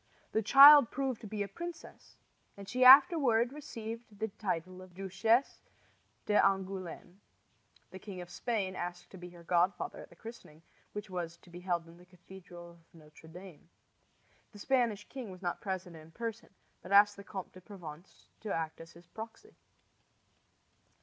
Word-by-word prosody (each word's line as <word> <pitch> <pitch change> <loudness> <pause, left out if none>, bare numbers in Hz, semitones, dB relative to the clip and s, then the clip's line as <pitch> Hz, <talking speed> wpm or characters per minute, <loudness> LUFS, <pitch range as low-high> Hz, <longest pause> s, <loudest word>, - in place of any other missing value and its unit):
The 220 - +1
child 280 +3 +9
proved 265 -3 -3
to 215 - -8
be 205 0 -3
a - - -6
princess, 340 - -10 0.4
and 200 -1 -10
she 255 +4 0
afterward 260 -3 +7
received 230 -6 -7 0.2
the 220 +1 -3
title 185 -3 -4
of 185 -1 -15
Duchesse 195 +7 0 0.6
d'Angouleme. 190 -3 -1 0.7
The 190 - -9
King 190 -1 -9
of 175 0 -9
Spain 200 -6 -2
asked 175 0 -6
to 190 - -11
be 180 0 -9
her 175 -1 -15
godfather 175 +2 0
at - - -11
the - - -18
christening, 170 -7 -12 0.3
which 210 -1 -7
was 170 -2 -5
to 175 - -20
be 175 - -9
held 175 -2 -2
in 170 +1 -16
the 180 - -18
cathedral 180 -1 -13
of 170 - -20 0.2
Notre 155 0 -17
Dame. 175 -1 -13 0.8
The - - -12
Spanish 225 -3 0
king 255 -6 -8
was 185 0 -12
not 175 - -3
present 185 -3 -5
in 160 0 -13
person, 230 +5 -6 0.3
but 185 - -11
asked 205 +1 +6
the 200 - -11
Comte 190 -2 -8
de 185 - -13
Provence 175 -4 -12
to 215 - -6
act 160 -1 -3
as 165 +1 -13
his 170 +1 -17
proxy. 225 - -11
190 Hz, 165 wpm, -32 LUFS, 175-225 Hz, 0.8 s, child